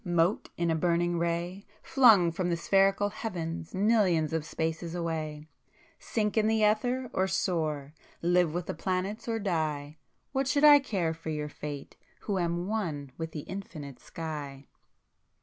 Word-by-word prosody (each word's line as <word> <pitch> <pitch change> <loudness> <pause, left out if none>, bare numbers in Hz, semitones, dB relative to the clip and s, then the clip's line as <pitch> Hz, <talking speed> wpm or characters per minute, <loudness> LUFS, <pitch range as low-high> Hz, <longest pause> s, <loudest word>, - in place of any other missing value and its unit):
Mote 175 +1 +1
in 170 -1 +1
a - - +2
burning 175 +1 +1
ray 170 +3 -2 0.2
Flung 220 -10 +6
from 175 +2 -1
the 170 - +1
spherical 195 +3 +3
Heavens 170 -7 -5
millions 190 -7 +3
of 160 -2 0
spaces 165 +2 -3
away— 155 -3 -3 0.5
Sink 210 -2 -1
in 220 -1 +3
the 220 -1 +2
ether 245 +4 +1
or 190 +1 +1
soar! 155 -6 -1 0.3
Live 175 -1 +3
with 175 +2 -3
the - - -3
planets 190 +6 -2
or 225 -1 0
die!— 155 -7 -2 0.3
What 270 -1 0
should 285 +1 +2
I 295 -1 +10
care 190 -11 -1
for 160 0 -7
your 150 -1 -3
fate, 145 -1 -7 0.2
who 200 -3 -1
am 175 0 -1
one 165 -10 -3
with 160 0 -4
the 155 - -5
Infinite 155 -7 -8
Sky! 145 -4 -6
175 Hz, 155 wpm, -29 LUFS, 160-200 Hz, 0.5 s, I